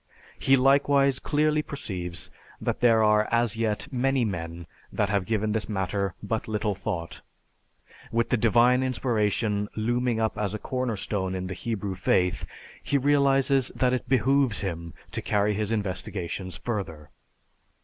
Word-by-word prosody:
He 135 Hz, 0 st, +4 dB
likewise 140 Hz, 0 st, +4 dB
clearly 150 Hz, 0 st, +1 dB
perceives 90 Hz, -, -6 dB, 0.3 s
that -, -, -2 dB
there 115 Hz, -2 st, +5 dB
are 105 Hz, 0 st, +4 dB
as 115 Hz, -2 st, +2 dB
yet 110 Hz, 0 st, -1 dB
many 130 Hz, 0 st, +1 dB
men 85 Hz, -3 st, -5 dB, 0.3 s
that 105 Hz, -, 0 dB
have 100 Hz, -2 st, 0 dB
given 110 Hz, -1 st, 0 dB
this 105 Hz, 0 st, -2 dB
matter 100 Hz, -1 st, -1 dB
but 110 Hz, +2 st, -2 dB
little 105 Hz, -1 st, -1 dB
thought; 90 Hz, -4 st, -5 dB, 0.9 s
with 115 Hz, 0 st, +1 dB
the -, -, +3 dB
Divine 120 Hz, +3 st, +4 dB
inspiration 110 Hz, -5 st, 0 dB
looming 120 Hz, +1 st, 0 dB
up 110 Hz, -1 st, -1 dB
as 105 Hz, -1 st, -1 dB
a -, -, -2 dB
corner 125 Hz, -1 st, -2 dB
stone 95 Hz, -2 st, -2 dB
in 95 Hz, 0 st, -3 dB
the 95 Hz, -, -4 dB
Hebrew 100 Hz, -1 st, -3 dB
faith 90 Hz, -1 st, +1 dB, 0.3 s
he 140 Hz, -, +1 dB
realizes 135 Hz, -1 st, +3 dB
that 125 Hz, -1 st, +2 dB
it 125 Hz, -1 st, -3 dB
behooves 130 Hz, -2 st, +2 dB
him 85 Hz, -4 st, -5 dB, 0.2 s
to -, -, -3 dB
carry 105 Hz, 0 st, +1 dB
his 105 Hz, +1 st, -1 dB
investigations 95 Hz, -3 st, -3 dB
further. 80 Hz, -10 st, -5 dB
110 Hz, 150 wpm, -26 LUFS, 100-125 Hz, 0.9 s, there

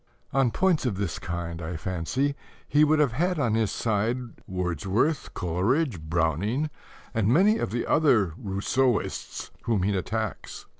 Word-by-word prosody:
On 135 Hz, -2 st, +3 dB
points 175 Hz, 0 st, +2 dB
of 110 Hz, -, -1 dB
this 100 Hz, -4 st, -2 dB
kind, 85 Hz, -1 st, -4 dB
I 85 Hz, +1 st, -4 dB
fancy, 95 Hz, -, -1 dB, 0.3 s
he 150 Hz, +1 st, +4 dB
would 155 Hz, +1 st, +4 dB
have 150 Hz, -5 st, +3 dB
had 175 Hz, +8 st, 0 dB
on 125 Hz, -7 st, +1 dB
his 110 Hz, -2 st, +2 dB
side 110 Hz, +2 st, 0 dB, 0.3 s
Wordsworth, 95 Hz, -, 0 dB
Coleridge, 100 Hz, -, 0 dB
Browning, 85 Hz, -, 0 dB, 0.4 s
and 110 Hz, -4 st, +1 dB
many 195 Hz, -, +4 dB
of -, -, -1 dB
the 120 Hz, +4 st, -2 dB
other 115 Hz, -, +3 dB
"Rousseauists" 110 Hz, +5 st, -1 dB
whom 110 Hz, -6 st, +1 dB
he 100 Hz, +1 st, +1 dB
attacks. 110 Hz, +2 st, -3 dB
110 Hz, 145 wpm, -26 LUFS, 90-140 Hz, 0.4 s, he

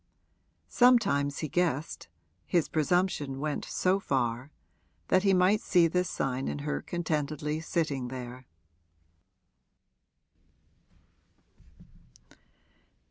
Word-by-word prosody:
Sometimes 200 Hz, -, +3 dB
he -, -, -3 dB
guessed 160 Hz, -2 st, -1 dB, 0.4 s
his 170 Hz, -3 st, +1 dB
presumption 155 Hz, -4 st, 0 dB
went 150 Hz, 0 st, -2 dB
so 185 Hz, +1 st, +1 dB
far 125 Hz, -5 st, -1 dB, 0.6 s
that 185 Hz, -, +4 dB
he 195 Hz, 0 st, +3 dB
might 190 Hz, +3 st, +3 dB
see 175 Hz, -3 st, +3 dB
this 180 Hz, +1 st, 0 dB
sign 130 Hz, 0 st, -2 dB
in -, -, -3 dB
her 150 Hz, -, -2 dB
contentedly 155 Hz, -2 st, -2 dB
sitting 155 Hz, -6 st, -2 dB
there. 125 Hz, 0 st, -8 dB
155 Hz, 85 wpm, -29 LUFS, 135-180 Hz, 0.6 s, that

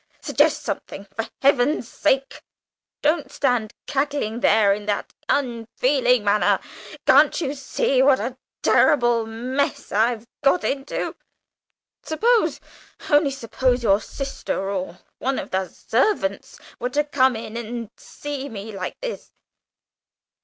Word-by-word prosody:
Suggest -, -, +2 dB
something, 200 Hz, -, -5 dB
for 225 Hz, -, -3 dB
Heaven's 275 Hz, -1 st, +3 dB
sake; 270 Hz, +2 st, 0 dB, 0.6 s
don't 300 Hz, 0 st, +1 dB
stand 245 Hz, -6 st, 0 dB
cackling 280 Hz, -5 st, -1 dB
there 210 Hz, -3 st, +4 dB
in 205 Hz, +1 st, -6 dB
that 205 Hz, -, -2 dB, 0.2 s
unfeeling 250 Hz, -1 st, +1 dB
manner. 205 Hz, +1 st, +3 dB, 0.5 s
Can't -, -, +5 dB
you 285 Hz, -5 st, -2 dB
see 270 Hz, -1 st, 0 dB
what 270 Hz, 0 st, +5 dB
a 240 Hz, +5 st, -3 dB, 0.3 s
terrible, 240 Hz, -6 st, +4 dB
mess 255 Hz, +5 st, -2 dB
I've 225 Hz, +2 st, +1 dB, 0.2 s
got 285 Hz, +6 st, +3 dB
into? 275 Hz, +1 st, -2 dB, 0.9 s
Suppose 325 Hz, -, +2 dB, 0.5 s
only 290 Hz, 0 st, +5 dB
suppose 255 Hz, -1 st, 0 dB
your 200 Hz, -1 st, +4 dB
sister 270 Hz, -7 st, -4 dB
or 185 Hz, -2 st, -4 dB, 0.2 s
one 265 Hz, +1 st, -1 dB
of -, -, -5 dB
the 190 Hz, 0 st, 0 dB
servants 225 Hz, -, -1 dB, 0.2 s
were 245 Hz, -, -1 dB
to 290 Hz, +3 st, +1 dB
come 265 Hz, -4 st, +2 dB
in, 220 Hz, 0 st, -7 dB
and 230 Hz, -1 st, -5 dB
see 285 Hz, -1 st, -6 dB
me 220 Hz, 0 st, -7 dB
like 190 Hz, -3 st, -6 dB
this!" -, -, -6 dB
250 Hz, 125 wpm, -23 LUFS, 220-280 Hz, 0.9 s, Can't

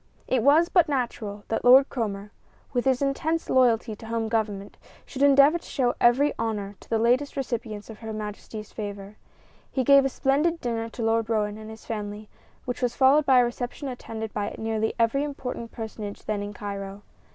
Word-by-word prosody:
It 255 Hz, -2 st, +1 dB
was 295 Hz, +7 st, +5 dB
but 345 Hz, -3 st, +3 dB
natural 230 Hz, -6 st, -3 dB
that 225 Hz, -, -1 dB
Lord 260 Hz, +3 st, +7 dB
Cromer, 205 Hz, -4 st, -4 dB, 0.4 s
with 245 Hz, 0 st, 0 dB
his 265 Hz, 0 st, +2 dB
intense 315 Hz, +4 st, -1 dB
loyalty 235 Hz, -3 st, +3 dB
to 225 Hz, -, -12 dB
the -, -, -10 dB
home 225 Hz, -1 st, -1 dB
Government, 205 Hz, -3 st, -2 dB, 0.3 s
should 270 Hz, -, -7 dB
endeavor 285 Hz, +3 st, +6 dB
to -, -, -22 dB
show 250 Hz, -4 st, 0 dB
every 265 Hz, +5 st, +4 dB
honor 210 Hz, -3 st, -3 dB
to -, -, -18 dB
the 225 Hz, -, +2 dB
latest 250 Hz, +6 st, +1 dB
recipients 230 Hz, -5 st, -4 dB
of 220 Hz, -2 st, -11 dB
Her 225 Hz, -1 st, -6 dB
Majesty's 215 Hz, 0 st, -7 dB
favor. 205 Hz, -1 st, -7 dB, 0.5 s
He 260 Hz, -, 0 dB
gave 275 Hz, +2 st, +6 dB
a 270 Hz, -, +1 dB
splendid 295 Hz, +6 st, +1 dB
dinner 230 Hz, -3 st, -3 dB
to 230 Hz, -, -6 dB
Lord 225 Hz, 0 st, +1 dB
Roane 210 Hz, -1 st, -1 dB
and 215 Hz, 0 st, -9 dB
his 220 Hz, 0 st, -11 dB
family, 210 Hz, -1 st, -5 dB, 0.4 s
which 250 Hz, +1 st, -4 dB
was 245 Hz, -1 st, 0 dB
followed 280 Hz, +3 st, +4 dB
by 260 Hz, -2 st, +6 dB
a -, -, +3 dB
reception 245 Hz, +4 st, -5 dB
attended 225 Hz, -3 st, -6 dB
by 205 Hz, -1 st, -3 dB
nearly 220 Hz, 0 st, -1 dB
every 230 Hz, +5 st, +2 dB
important 250 Hz, -5 st, -5 dB
personage 215 Hz, -3 st, -7 dB
then 210 Hz, -1 st, -2 dB
in 205 Hz, 0 st, -5 dB
Cairo. 200 Hz, -1 st, -6 dB
230 Hz, 190 wpm, -26 LUFS, 215-265 Hz, 0.5 s, Lord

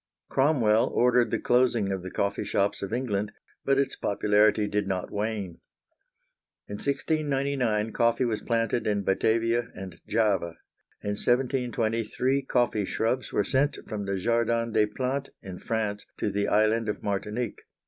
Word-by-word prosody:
Cromwell 125 Hz, -6 st, +3 dB
ordered 125 Hz, -1 st, +3 dB
the -, -, 0 dB
closing 120 Hz, -5 st, +2 dB
of 95 Hz, -1 st, -2 dB
the 95 Hz, -, -6 dB
coffee 100 Hz, +2 st, -1 dB
shops 100 Hz, 0 st, 0 dB
of 100 Hz, -, -4 dB
England, 105 Hz, -4 st, -1 dB, 0.3 s
but 135 Hz, 0 st, +2 dB
its 140 Hz, -1 st, 0 dB
popularity 105 Hz, +1 st, +2 dB
did 105 Hz, -1 st, -1 dB
not 95 Hz, -2 st, -3 dB
wane. 105 Hz, -4 st, -3 dB, 1.1 s
In 100 Hz, -, -5 dB
1699 135 Hz, -6 st, 0 dB
coffee 115 Hz, +3 st, +2 dB
was 110 Hz, -3 st, -1 dB
planted 115 Hz, 0 st, 0 dB
in 100 Hz, -1 st, 0 dB
Batavia 115 Hz, +4 st, +1 dB
and 95 Hz, -3 st, -9 dB
Java. 95 Hz, -7 st, +1 dB, 0.5 s
In 105 Hz, -, -1 dB
1720 120 Hz, -1 st, 0 dB
three 130 Hz, +5 st, 0 dB
coffee 120 Hz, -6 st, +1 dB
shrubs 115 Hz, +6 st, -1 dB
were 105 Hz, -, +1 dB
sent 140 Hz, +7 st, +1 dB
from 105 Hz, -2 st, -4 dB
the 100 Hz, 0 st, -1 dB
Jardin 115 Hz, +2 st, +1 dB
des 110 Hz, -1 st, +3 dB
Plantes 130 Hz, +5 st, -3 dB
in 95 Hz, -2 st, -8 dB
France 110 Hz, -3 st, -2 dB
to 105 Hz, -, -1 dB
the 100 Hz, +1 st, 0 dB
Island 110 Hz, +1 st, +2 dB
of 105 Hz, -, -4 dB
Martinique. 105 Hz, +3 st, -3 dB
110 Hz, 150 wpm, -27 LUFS, 105-125 Hz, 1.1 s, Cromwell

